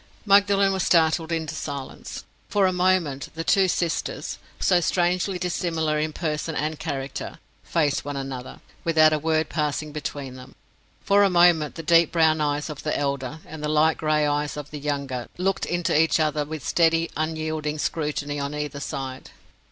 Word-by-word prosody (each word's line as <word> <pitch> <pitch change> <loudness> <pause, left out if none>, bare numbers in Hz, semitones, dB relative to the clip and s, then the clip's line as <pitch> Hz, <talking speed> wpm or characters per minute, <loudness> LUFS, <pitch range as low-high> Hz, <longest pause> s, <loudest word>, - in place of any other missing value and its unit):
Magdalen 200 -1 +4
was 190 - -1
startled 165 -1 +3
into 160 -1 -2
silence. 140 -3 -6 0.3
For 200 -2 +3
a 185 - +2
moment, 180 -6 +1
the 165 - -3
two 190 +2 +4
sisters—so 180 - -1
strangely 180 +2 +1
dissimilar 165 -3 -1
in 155 +1 -1
person 155 0 -3
and 155 +1 -2
character—faced 145 +1 -3
one 145 0 -4
another, 135 -2 -6 0.2
without 155 -2 +5
a 155 - +1
word 160 0 +1
passing 150 0 -2
between 145 -3 -5
them. 130 +1 -12 0.5
For 200 +1 +4
a 200 - +5
moment 175 -4 +4
the 165 - -6
deep 165 0 +4
brown 160 -2 +3
eyes 145 0 0
of 150 -3 -7
the 150 - -1
elder 140 +1 -3
and 155 0 -9
the 150 - -1
light 155 +1 +3
gray 155 -1 +2
eyes 145 -1 -1
of 145 -1 -7
the 150 - -6
younger 140 -4 -3
looked 190 +2 0
into 175 -2 0
each 160 +1 +3
other 150 -1 +1
with 155 -2 -6
steady, 165 0 +2
unyielding 155 -1 -2
scrutiny 145 -2 -2
on 140 +1 -3
either 150 -1 -4
side. 135 -2 -5
155 Hz, 165 wpm, -24 LUFS, 145-170 Hz, 0.5 s, without